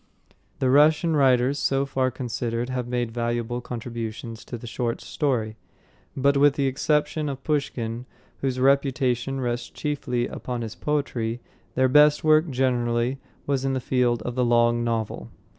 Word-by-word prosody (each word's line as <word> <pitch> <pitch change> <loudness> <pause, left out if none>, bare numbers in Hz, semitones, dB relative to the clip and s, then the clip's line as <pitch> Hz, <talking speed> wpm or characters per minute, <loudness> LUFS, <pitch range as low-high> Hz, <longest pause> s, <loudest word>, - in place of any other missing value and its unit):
The 130 -1 +1
Russian 155 +3 +4
writers 135 0 +3
so 135 0 +1
far 130 -1 0
considered 120 -1 -3
have 125 -2 -3
made 120 -1 -2
valuable 120 +1 -2
contributions 115 -1 -6
to 120 - -6
the 115 - -11
short 120 0 -2
story; 115 -7 -2 0.6
but, 140 +1 +3
with 145 0 +5
the 140 -3 0
exception 150 +3 0
of 135 -1 -6
Pushkin, 125 -5 -2 0.3
whose 130 -2 -2
reputation 135 -1 +1
rests 120 -1 -2
chiefly 130 -5 -2
upon 125 -1 -5
his 110 -1 -5
poetry, 125 -6 -2 0.4
their 130 0 +4
best 150 +2 +5
work, 155 +1 +4
generally, 125 -1 0 0.3
was 135 -2 0
in 135 0 0
the 130 - 0
field 120 -3 +1
of 125 - -3
the 125 +1 0
long 120 0 +3
novel. 115 -2 -2
125 Hz, 150 wpm, -25 LUFS, 120-140 Hz, 0.6 s, with